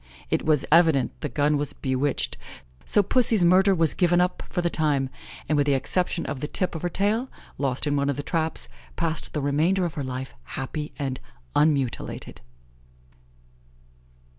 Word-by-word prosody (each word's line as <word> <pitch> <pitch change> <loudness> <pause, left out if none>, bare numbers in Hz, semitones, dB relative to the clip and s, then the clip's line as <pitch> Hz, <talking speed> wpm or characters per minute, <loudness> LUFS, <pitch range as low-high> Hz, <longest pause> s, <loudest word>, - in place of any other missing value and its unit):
It - - +1
was 155 -3 +2
evident 160 -6 +4
the 150 - -2
gun 145 +1 +1
was 145 -1 -2
bewitched, 130 +1 -1 0.5
so 205 - +3
Pussy's 225 -3 +3
murder 190 +3 +5
was 165 -3 +2
given 175 -1 +3
up 180 +1 +1
for 175 - -2
the 170 - +2
time, 140 -4 0 0.4
and, 155 - +1
with 145 -1 +2
the 140 - +4
exception 175 +5 0
of 135 - -4
the 150 - -3
tip 185 +4 -2
of 165 - -5
her 175 - -1
tail, 215 +8 0 0.3
lost 135 -1 0
in 145 -1 +1
one 140 0 +1
of 140 - -1
the 145 - -3
traps, 160 +1 -2 0.3
passed 165 -2 -1
the 150 - -1
remainder 165 +7 +2
of 170 - -3
her 145 - -4
life 130 0 -5 0.2
happy 150 +3 -4
and 135 -3 -3 0.4
unmutilated. 140 - 0
155 Hz, 170 wpm, -25 LUFS, 140-175 Hz, 0.5 s, murder